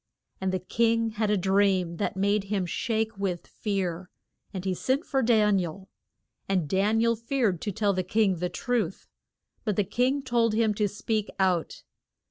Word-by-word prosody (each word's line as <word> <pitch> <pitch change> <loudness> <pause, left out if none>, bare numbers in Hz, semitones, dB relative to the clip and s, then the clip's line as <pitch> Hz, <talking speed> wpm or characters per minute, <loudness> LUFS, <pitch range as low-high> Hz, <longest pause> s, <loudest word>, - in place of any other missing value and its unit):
And 190 0 0
the 185 - 0
king 230 +4 +1
had 215 0 -1
a 210 - +3
dream 190 -2 +2
that 195 - -2
made 200 +1 +1
him 195 -2 -1
shake 220 +2 -2
with 185 -4 -2
fear, 185 -4 -3 0.4
and 190 -2 -6
he 190 - +1
sent 265 - -1
for 270 -2 0
Dan 215 -4 +4
i - - 0
el. 190 +4 -9 0.6
And 185 -5 +1
Dan 200 +7 +2
i - - +3
el 230 0 +3
feared 230 - 0
to 205 - -2
tell 205 0 +1
the 185 - 0
king 195 0 +1
the 180 +2 -2
truth. 245 +4 -2 0.6
But 210 -4 -1
the 205 - +2
king 255 +8 0
told 235 -4 +1
him 220 -1 +2
to 210 0 +1
speak 215 +1 -2
out. 185 -4 0
205 Hz, 185 wpm, -27 LUFS, 190-225 Hz, 0.6 s, Dan